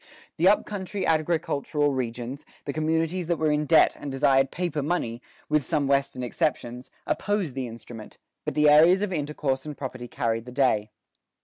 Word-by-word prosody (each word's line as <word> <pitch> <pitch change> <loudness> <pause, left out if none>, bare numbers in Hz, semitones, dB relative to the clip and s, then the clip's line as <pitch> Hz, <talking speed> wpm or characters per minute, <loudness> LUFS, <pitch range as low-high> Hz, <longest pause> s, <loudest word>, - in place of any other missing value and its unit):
The - - +3
up - - +4
country 200 -1 -4
agricultural 155 -2 0
regions, 125 +1 -4 0.2
the 140 - -3
communities 160 +3 0
that 170 -1 +1
were 155 -1 +1
in 150 0 0
debt 160 - +5
and 145 - -5
desired 135 0 +3
paper 175 -5 -2
money, 135 -7 -2 0.3
with 150 -1 +2
some 150 0 0
Western 140 -2 0
exceptions, 125 -1 -2 0.2
opposed 205 -8 -1
the 130 -1 -3
instrument; 115 -1 -10 0.3
but - - -4
the 150 0 +4
areas 165 +6 +6
of 200 -3 -2
intercourse 145 -3 -2
and 150 -2 -7
property 130 -3 -6
carried 115 -1 -2
the 125 - -9
day. 120 -5 +1
145 Hz, 170 wpm, -26 LUFS, 130-160 Hz, 0.3 s, areas